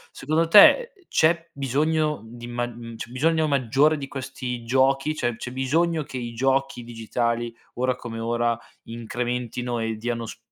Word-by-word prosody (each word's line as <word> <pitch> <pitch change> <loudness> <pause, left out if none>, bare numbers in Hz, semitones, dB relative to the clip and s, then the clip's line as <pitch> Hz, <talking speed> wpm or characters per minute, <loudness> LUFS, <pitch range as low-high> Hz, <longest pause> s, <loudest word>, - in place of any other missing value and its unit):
Secondo 155 +4 0
te, 470 - +7 0.2
c'è 170 +1 +2
bisogno 150 +2 0
di 120 +1 -10
mag 120 0 -3
mhmm, 115 -1 -9
c'è 115 - -7
bisogno 160 +5 +2
maggiore 140 +3 +3
di 140 -2 -6
questi 130 -2 -5
giochi? 135 +4 +2
Cioè, 120 -6 -1
c'è 125 - -6
bisogno 155 +5 +1
che 135 - -7
i 120 -2 -5
giochi 135 +1 0
digitali, 115 0 -2 0.2
ora 130 0 0
come 115 -2 -7
ora, 120 0 0 0.3
incrementino 120 +1 -3
e 110 0 -2
diano 115 +1 -3
s - - -8
125 Hz, 155 wpm, -24 LUFS, 120-145 Hz, 0.3 s, te